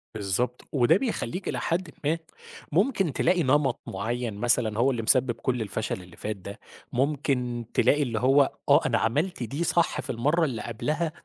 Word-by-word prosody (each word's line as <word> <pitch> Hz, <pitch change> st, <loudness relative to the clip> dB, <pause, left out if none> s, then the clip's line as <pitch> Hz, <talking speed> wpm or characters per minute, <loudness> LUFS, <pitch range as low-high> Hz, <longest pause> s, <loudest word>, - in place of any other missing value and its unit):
بالضبط، 110 Hz, +5 st, -1 dB
وده 140 Hz, +5 st, +4 dB
بيخلّيك 200 Hz, -6 st, -3 dB
إلى -, -, -2 dB
حدٍ 170 Hz, -1 st, -1 dB
ما، 155 Hz, +3 st, +1 dB, 0.5 s
ممكن 195 Hz, -, +2 dB
تلاقي 175 Hz, +4 st, +2 dB
نمط 135 Hz, -1 st, +2 dB
معيّن 115 Hz, +3 st, -3 dB
مثلًا 110 Hz, 0 st, +1 dB
هو 130 Hz, +3 st, +4 dB
اللي 120 Hz, -3 st, -2 dB
مسبّب 120 Hz, +2 st, +3 dB
كل 120 Hz, +1 st, -2 dB
الفشل 105 Hz, -2 st, -3 dB
اللي 90 Hz, -1 st, -14 dB
فات 105 Hz, 0 st, -3 dB
ده، 100 Hz, +1 st, -10 dB, 0.3 s
ممكن 125 Hz, -3 st, 0 dB
تلاقي 145 Hz, +1 st, +3 dB
اللي 115 Hz, -5 st, -2 dB
هو 135 Hz, +3 st, +4 dB, 0.2 s
آه، -, -, +7 dB
أنا -, -, +2 dB
عملت 150 Hz, +6 st, 0 dB
دي 135 Hz, +9 st, -3 dB
صح 170 Hz, 0 st, +1 dB
في -, -, -11 dB
المَرّة 150 Hz, +9 st, +1 dB
اللي 125 Hz, -7 st, -3 dB
قبلها، 155 Hz, +8 st, -2 dB
130 Hz, 170 wpm, -26 LUFS, 115-155 Hz, 0.5 s, آه